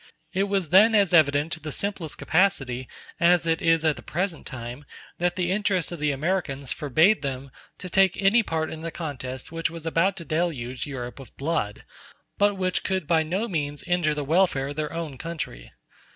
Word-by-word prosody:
It 195 +1 +2
was 195 -5 -1
then 215 +5 +7
as 200 -4 +3
evident 150 -1 +4
to 160 - -4
the 155 -1 -6
simplest 165 -6 -3
capacity 135 -9 +1 0.3
as 175 0 +4
it 165 0 +1
is 165 -1 +3
at 155 -2 +2
the - - -9
present 175 0 -3
time 120 +2 -7 0.4
that 175 0 +1
the 180 -1 0
interest 195 -3 0
of 175 - -6
the 150 0 +1
Americans 140 -3 -2
forbade 160 - +3
them 135 -1 -4 0.3
to - - -7
take 190 0 +3
any 200 +4 +4
part 160 -6 -2
in 160 - -7
the 165 - -3
contest 130 -6 -6
which 165 0 -1
was 165 -1 -9
about 170 +4 +1
to 170 - -7
deluge 145 -6 -2
Europe 125 -2 -6
with 135 - -13
blood, 140 -8 -2 0.6
but 205 0 +4
which 185 -1 -1
could 190 -4 -1
by 160 +1 +3
no 185 +8 -1
means 145 -6 -3
injure 175 -4 +1
the 150 - -2
welfare 155 -4 +2
of 145 - -6
their 155 0 -2
own 160 -6 -5
country. 155 - -6
165 Hz, 195 wpm, -25 LUFS, 145-185 Hz, 0.6 s, then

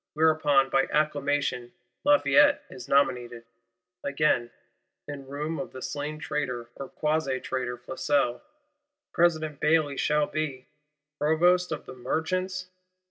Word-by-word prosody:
Whereupon, 150 -3 +3
by 135 - +3
acclamation, 145 -4 0 0.3
Lafayette 290 0 +5
is 125 -1 -9
nominated. 125 -4 +1 0.6
Again, 140 -4 +1 0.6
in 140 -2 -7
room 150 +4 -4
of 180 - -6
the 130 - -8
slain 145 +1 -4
traitor 125 -6 -3
or 135 - -7
quasi 150 -4 -1
traitor 125 -2 -3
Flesselles, 130 0 -1 0.7
President 155 -4 +1
Bailly 150 -3 +2
shall 150 0 +2
be—Provost 150 +4 -1
of 155 - -4
the - - -9
Merchants? 185 +8 -2
145 Hz, 110 wpm, -27 LUFS, 135-155 Hz, 0.7 s, Lafayette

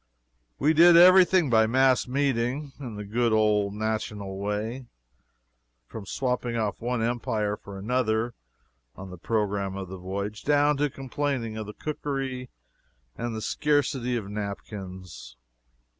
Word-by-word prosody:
We 150 +3 +3
did 170 +2 +7
every 185 +2 +9
thing 180 -4 +2
by 110 -1 +5
mass 130 +2 +3
meeting, 135 +1 -1
in 125 -6 -7
the 105 - -6
good 115 +3 0
old 105 -2 +2
national 105 -2 -3
way, 110 +5 -3 1.0
from 100 - -9
swapping 125 -1 -2
off 110 -2 -2
one 120 -1 -1
empire 110 -3 -1
for 100 -1 -11
another 115 +2 0 0.6
on 95 0 -9
the 90 - -10
programme 100 -2 -1
of 95 -2 -6
the 95 - -7
voyage 100 +3 -5
down 145 0 +3
to 145 +1 +1
complaining 135 -3 -3
of 110 -1 -5
the 105 - -7
cookery 135 -4 -4 0.7
and 120 -1 -4
the 110 - -5
scarcity 140 -4 0
of 105 -4 -5
napkins. 95 - -7
115 Hz, 140 wpm, -26 LUFS, 105-135 Hz, 1.0 s, every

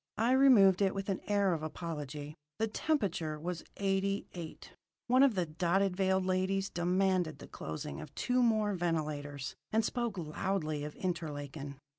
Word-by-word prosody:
I 230 +3 +3
removed 235 -8 +6
it 195 -1 +2
with 195 0 -3
an 190 - -1
air 200 -3 +3
of 160 - -2
apology. 150 -2 -5 0.2
The 225 - +2
temperature 190 - -1
was 170 +1 -4
eighty 195 0 0
eight. 165 -3 -8 0.3
One 255 +2 +4
of 275 -5 +5
the 180 -2 +1
dotted 180 +4 +1
veiled 190 0 +2
ladies 190 +1 0
demanded 180 -1 +1
the - - -10
closing 80 - -6
of 155 -2 -9
two 250 0 +1
more 215 -3 +3
ventilators, 150 -5 -2 0.2
and 220 0 +2
spoke 235 -5 -2
loudly 155 -2 -2
of 150 0 -6
Interlaken. 145 -5 -4
185 Hz, 155 wpm, -33 LUFS, 155-200 Hz, 0.3 s, removed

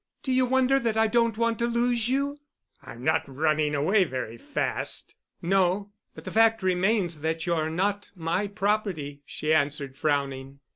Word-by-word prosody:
Do 265 - -2
you 255 0 +3
wonder 265 +1 +3
that 230 -3 -1
I 220 - +4
don't 230 -1 +2
want 230 -1 0
to 235 - +1
lose 235 0 +1
you?" 280 +2 -1 0.4
"I'm 130 -3 -11
not 155 +3 +3
running 150 +1 +1
away 185 +8 +3
very 130 -7 -4
fast." 115 - -2 0.3
"No. 195 +2 +1 0.2
But - - -10
the - - -6
fact 225 -1 +3
remains 185 -3 +1
that 160 +1 -2
you're 165 -3 0
not 200 +5 -1
my 175 +4 -1
property," 200 -8 -2
she 155 +1 -1
answered, 145 -3 0
frowning. 140 -2 -2
185 Hz, 160 wpm, -26 LUFS, 150-225 Hz, 0.4 s, I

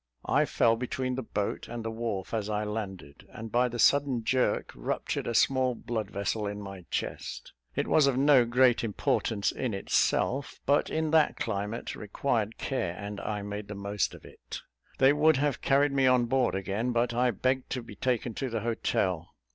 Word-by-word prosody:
I - - +3
fell 115 0 +3
between 130 +1 -2
the 130 - -2
boat 105 -3 -3
and 115 -1 -6
the 115 - -2
wharf 110 -4 -4
as 110 -2 -1
I 105 0 -1
landed, 100 -8 -6
and 110 0 -8
by 125 +1 +3
the 120 0 -5
sudden 135 -1 +3
jerk 130 +2 +1
ruptured - - -3
a 115 - -2
small 130 0 +3
bloodvessel 105 -2 -3
in 105 0 -4
my 95 -3 -8
chest; - - -4 0.2
it - - 0
was 150 -3 +4
of 135 -2 +1
no 140 -2 +6
great 120 +1 +3
importance 105 -1 0
in 125 -6 -3
itself, 130 +6 0
but 140 +1 +3
in 160 -1 -1
that 160 -2 +4
climate 105 +1 -3
required 110 +1 -2
care, 95 -11 -2
and 100 0 -6
I 105 -2 -3
made 105 0 -5
the 105 - -6
most 100 0 -2
of - - -15
it. - - -9 0.4
They 135 +1 +6
would 150 0 +4
have 145 -1 0
carried 140 +1 +3
me 135 -1 +3
on 125 -1 +4
board 130 -1 +1
again, 100 +5 -1
but 120 0 +1
I 125 +1 +2
begged 130 +4 0
to 125 -2 -3
be 115 - -10
taken 125 -1 -1
to 135 +4 -3
the 115 -2 -2
hotel. 95 -6 -1
115 Hz, 185 wpm, -29 LUFS, 105-130 Hz, 0.4 s, no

